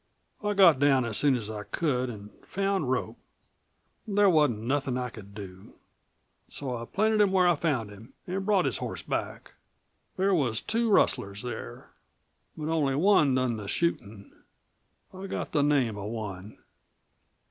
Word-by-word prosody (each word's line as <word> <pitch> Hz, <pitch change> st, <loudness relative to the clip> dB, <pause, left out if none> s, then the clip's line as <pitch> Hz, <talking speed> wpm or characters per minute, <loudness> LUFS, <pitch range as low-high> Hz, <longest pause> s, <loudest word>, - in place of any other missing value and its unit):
I 210 Hz, 0 st, 0 dB
got 175 Hz, -8 st, +6 dB
down 135 Hz, -3 st, +3 dB
as 110 Hz, -3 st, -2 dB
soon 145 Hz, -3 st, +3 dB
as 115 Hz, -4 st, -4 dB
I 110 Hz, -1 st, -5 dB
could 130 Hz, +2 st, -1 dB
an' 105 Hz, -3 st, -9 dB
found 195 Hz, -7 st, -1 dB
Rope. 130 Hz, -1 st, -2 dB, 0.9 s
There 205 Hz, -1 st, +4 dB
wasn't 145 Hz, -10 st, +2 dB
nothin' 135 Hz, 0 st, -1 dB
I 125 Hz, -1 st, -3 dB
could 100 Hz, -3 st, -12 dB
do. 95 Hz, -2 st, -10 dB, 0.7 s
So 130 Hz, -3 st, -4 dB
I 115 Hz, 0 st, -6 dB
planted 215 Hz, -, +1 dB
him 200 Hz, -2 st, +3 dB
where 185 Hz, -2 st, +4 dB
I 175 Hz, -, +5 dB
found 140 Hz, -10 st, -1 dB
him 110 Hz, +5 st, -14 dB
an' 190 Hz, +2 st, -3 dB
brought 195 Hz, -2 st, +2 dB
his -, -, 0 dB
horse -, -, -5 dB
back. -, -, -4 dB, 0.7 s
There 195 Hz, +1 st, +2 dB
was 125 Hz, -10 st, +1 dB
two 230 Hz, +1 st, 0 dB
rustlers 100 Hz, -, +2 dB
there. 120 Hz, -3 st, -7 dB, 0.7 s
But 155 Hz, 0 st, -4 dB
only 145 Hz, -5 st, +1 dB
one 150 Hz, -5 st, +4 dB
done 130 Hz, -3 st, 0 dB
the 105 Hz, -2 st, -7 dB
shootin'. 110 Hz, -10 st, -2 dB, 0.8 s
I 190 Hz, +1 st, -7 dB
got -, -, -4 dB
the 145 Hz, -, +2 dB
name 140 Hz, -7 st, +2 dB
of 100 Hz, +1 st, -5 dB
one." 105 Hz, -3 st, -7 dB
135 Hz, 160 wpm, -28 LUFS, 110-180 Hz, 0.9 s, got